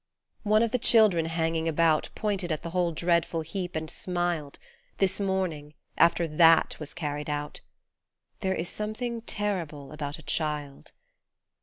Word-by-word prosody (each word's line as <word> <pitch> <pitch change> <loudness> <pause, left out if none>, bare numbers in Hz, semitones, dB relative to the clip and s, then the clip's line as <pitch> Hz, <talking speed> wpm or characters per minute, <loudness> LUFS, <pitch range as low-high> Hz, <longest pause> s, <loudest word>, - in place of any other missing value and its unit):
One 215 +1 +3
of 230 - 0
the 250 - +1
children 215 -9 +5
hanging 165 0 -1
about 160 -1 +2
Pointed 200 -5 -1
at 155 - -2
the 170 - -5
whole 175 -1 +1
dreadful 170 0 +1
heap 180 +2 -5
and 160 0 -3
smiled 175 -4 -2 0.4
This 195 0 +1
morning, 180 -7 -2 0.2
after 170 0 +3
THAT 165 +1 +5
was 150 -2 -7
carried 150 -3 -4
out; 145 0 -4 0.8
There 190 -2 0
is 165 - -3
something 230 +4 -4
terrible 175 -11 -3
about 145 -1 -5
a 160 - -14
child. 150 -2 -2
170 Hz, 145 wpm, -27 LUFS, 155-190 Hz, 0.8 s, children